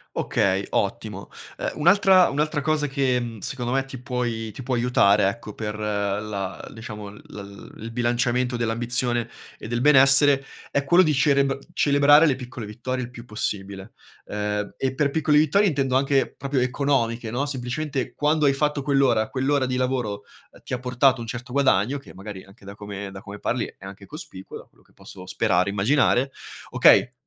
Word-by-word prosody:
Okay, 95 +1 0
ottimo. - - -3 0.3
Ehm, - - -2
un'altra 185 +3 +5
un'altra 150 +2 -1
cosa 150 0 0
che, 135 -2 0
mhmm, 115 -2 -6
secondo 120 +4 -4
me 135 0 0
ti 135 -1 -9
puoi 120 -4 -3
ti 130 - -9
può 130 0 -2
aiutare, 105 -4 +3
ecco, 105 0 -8
per 105 0 -5
la 100 -2 -3
diciamo 105 -2 -8
l 105 - -14 0.6
il - - -14
il 115 - -6
bilanciamento 120 +1 0
dell'ambizione 120 +1 0 0.3
e 110 - -9
del 120 - -1
benessere, 135 0 +6 0.3
è 140 - 0
quello 175 +6 +5
di 155 -4 +2
cerebr 140 0 +2
celebrare 145 +2 +5
le 140 -5 +2
piccole 125 -3 -8
vittorie 125 +4 -4
il 120 - -12
più 115 -1 -11
possibile. 100 -2 -5 0.3
Ehm, 105 0 -3
e 130 -1 -2
per 140 0 0
piccole 150 -1 +2
vittorie 190 +7 +3
intendo 135 -3 -1
anche 135 0 +1
proprio 135 0 -2
economiche, 125 -3 0
no, 135 +5 -1
semplicemente 135 +1 -3
quando 150 0 +1
hai 140 - +4
fatto 150 +1 0
quell'ora, 135 -6 +2
quell'ora 135 +1 0
di 130 0 -2
lavoro, 125 -6 -2 0.3
ehm, - - -19
ti - - -8
ha 125 - -1
portato 125 0 +2
un 115 - -7
certo 120 +2 -7
guadagno, 135 -1 +2
che - - -15
magari 95 0 -9
anche 100 0 -19
da 100 +1 -9
come 100 -1 -7
da 95 0 -10
come 100 +1 -10
parli 120 +2 -1
è 95 - -13
anche 100 0 -10
cospicuo, 95 - -10
da - - -12
quello - - -29
che - - -30
posso 95 -2 -13
sperare, 95 -1 +1
immaginare: 125 +5 +2 0.4
"Okay, 125 - +5
125 Hz, 180 wpm, -23 LUFS, 105-140 Hz, 0.6 s, benessere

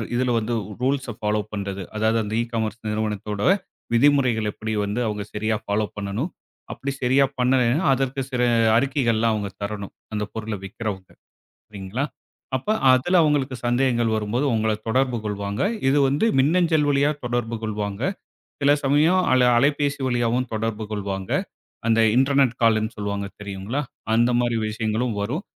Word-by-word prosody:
இதுல 125 0 +1
வந்து 115 +2 -3 0.3
ரூல்ஸ்ஸ 130 -2 0
ஃபாலோ 105 0 0
பண்றது? 100 -2 -4
அதாவது 110 +1 +2
அந்த 105 +1 -5
இ-காமர்ஸ் 115 -1 -3
நிறுவனத்தோட 105 -1 -3 0.6
விதிமுறைகளை 125 -5 +3
எப்படி 110 0 -4
வந்து 105 +4 -2
அவங்க 105 -1 -3
சரியா 110 +1 0
ஃபாலோ 105 +1 0
பண்ணணும்? 105 - -3 0.4
அப்படி 140 +1 -4
சரியா 135 +2 +4
பண்ணலைன்னா, 125 +5 +2
அதற்கு 135 +1 -1
சில 125 -1 0 0.4
அறிக்கைகள் 130 -3 +1
எல்லாம் 115 -1 +2
அவங்க 100 -2 -3
தரணும். 100 -1 -5 0.2
அந்தப் 105 0 -3
பொருள்ல 110 -2 -4
விற்கிறவங்க. 95 -2 -5 0.6
சரிங்களா? 105 +7 -3 0.5
அப்ப 135 - -8 0.2
அதுல 175 +8 +3
அவங்களுக்கு 140 -3 +1
சந்தேகங்கள் 120 -2 +2
வரும்போது 110 +7 -1
உங்கள 110 0 +1 0.2
தொடர்பு 125 +1 +1
கொள்வாங்க. 100 0 -3 0.3
இது 145 - +3
வந்து 145 +11 +1
மின்னஞ்சல் 160 0 +3
வழியா 140 +1 +3
தொடர்பு 120 -1 -1
கொள்வாங்க. 105 0 -3 0.6
சில 140 +1 +5
சமயம் 155 +7 +4
அல 130 -1 +5
அலைபேசி 145 +1 +1
வழியாவும் 120 0 0
தொடர்பு 110 0 -2
கொள்வாங்க. 95 -2 -4 0.6
அந்த 115 0 +3 0.2
இன்டர்நெட் 135 -2 +3
கால்னு 110 0 +3
சொல்லுவாங்க 100 -1 -3
தெரியுங்களா? 100 +7 -3 0.3
அந்த 120 +1 +4
மாரி 120 -1 0
விஷயங்களும் 110 +1 -1
வரும். 145 - -2
115 Hz, 140 wpm, -23 LUFS, 105-135 Hz, 0.6 s, சில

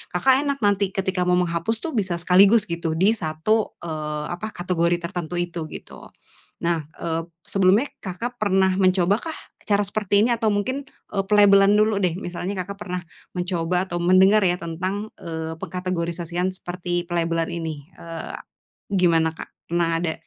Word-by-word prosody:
Kakak 260 +9 +5
enak 280 -1 0
nanti 200 -1 +3
ketika 190 -1 0
mau 180 - +4
menghapus 170 +5 0
tu 330 - -3
bisa 190 -6 0
sekaligus, 195 +5 +5
gitu, 170 -1 -2
di 195 +6 +4
satu, 205 +4 -1
eee, 150 -2 -3
apa, 215 +5 -5
kategori 175 -1 +1
tertentu 175 -1 -4
itu, 175 -2 -3
gitu. - - -10 0.6
Nah, 170 -3 0
eee, 165 0 -1 0.2
sebelumnya, 195 +6 +3 0.2
Kakak 230 +6 -5
pernah 190 -2 +3
mencoba 185 +1 +3
kah - - -8 0.3
cara 205 -1 +2
seperti 205 +1 +2
ini? 240 - +2
Atau 225 -2 +1
mungkin, 255 +8 -1 0.3
eee, 195 - +1
pelabelan 200 -1 +6
dulu 215 -1 +2
deh. 180 -2 +1
Misalnya 180 +1 -4
Kakak 200 +2 -9
pernah 180 -3 -3 0.4
mencoba 180 0 0
atau 175 - -2
mendengar 190 +4 +5
ya 180 -1 +2
tentang, 185 +6 -4
eee, 160 -1 -4
pengkategorisasian 175 0 -2
seperti 175 -1 -3
pelabelan 165 -1 0
ini, 160 -3 -5
eee, 165 -1 -7 0.6
gimana, 165 -3 +3
Kak? - - -8 0.2
Pernah 170 0 +1
ada 165 -2 0
180 Hz, 155 wpm, -23 LUFS, 170-200 Hz, 0.6 s, pelabelan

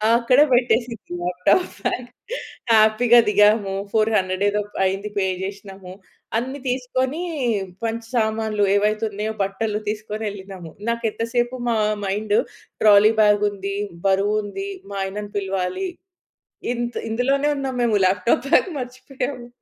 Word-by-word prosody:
అక్కడ 245 +3 +3
పెట్టేసింది 235 -4 0
లాప్‌టాప్ 180 - +2 0.2
బాగ్. 245 0 -1 0.7
హ్యాపీ‌గా 220 +2 +6
దిగాము. 210 -1 +4 0.2
400 200 -3 +1
ఏదో 210 0 0 0.2
అయింది. 195 +2 -1
పే 195 - +2 0.2
చేసినాము. 195 -2 -8 0.4
అన్ని 260 +4 -3
తీసుకొని 255 +4 -1 0.7
మంచి 225 0 -3
సామాన్లు 220 -2 +1
ఏవైతే 210 +2 +1
ఉన్నాయో 210 +2 -3
బట్టలు 210 +2 -2
తీసుకొని 215 +1 -4
ఎళ్ళినాము. 190 -4 -9 0.2
నాకెంత 230 -1 -1
సేపు 240 +1 +1
మా 230 - +2 0.3
మైండ్ 205 +2 -1 0.5
ట్రాలీ 210 0 +7
బాగ్ 210 0 +4
ఉంది. 200 0 -5 0.3
బరువు 195 +2 +2
ఉంది. 390 - -5 0.2
మా 200 - -6
ఆయనను 205 +2 -5
పిలవాలి 195 - -2 0.9
ఇంత్ 240 0 -3
ఇందులోనే 275 +5 +1
ఉన్నాము. 265 -2 -3
మేము 220 -3 +3
లాప్‌టాప్ 190 +7 +2
బ్యాగ్ 370 - +4
మర్చిపోయాము. 255 0 -5
215 Hz, 120 wpm, -22 LUFS, 200-240 Hz, 0.9 s, ట్రాలీ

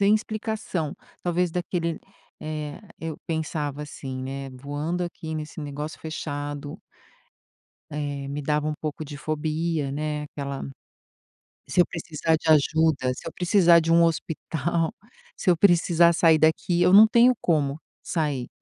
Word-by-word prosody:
sem 200 +2 +5
explicação, 215 -7 -2 0.3
talvez 175 0 +1
daquele 170 -1 -2 0.4
eh, 155 -1 -5 0.2
eu 160 -2 -4
pensava 150 -3 -2
assim, 135 -3 -6
né: 135 +1 -5
"Voando 145 +7 -3
aqui 160 -2 -5
nesse 155 +1 -6
negócio 150 +1 -5
fechado" 145 0 -5 1.1
eh, 145 -2 -4
me 145 +1 -3
dava 150 +1 0
um 155 - 0
pouco 155 0 -4
de 145 0 -8
fobia, 155 -1 -2
né, 150 +1 -2
aquela 140 -2 -5 1.0
se 180 - +4
eu - - +3
precisar 160 -1 -1
de 160 - -7
ajuda, 155 -3 +3
se - - -9
eu 165 - -6
precisar 175 -2 +5
de 165 0 0
um 170 0 +6
hospital, 165 0 -1 0.4
se 190 - -1
eu 175 - +4
precisar 170 -2 +5
sair 165 -1 +5
daqui, 160 +2 +2
eu 180 +1 +4
não 215 +3 +10
tenho 235 +3 +5
como 150 -3 +1 0.2
sair. 150 -7 -1
155 Hz, 140 wpm, -25 LUFS, 145-170 Hz, 1.1 s, não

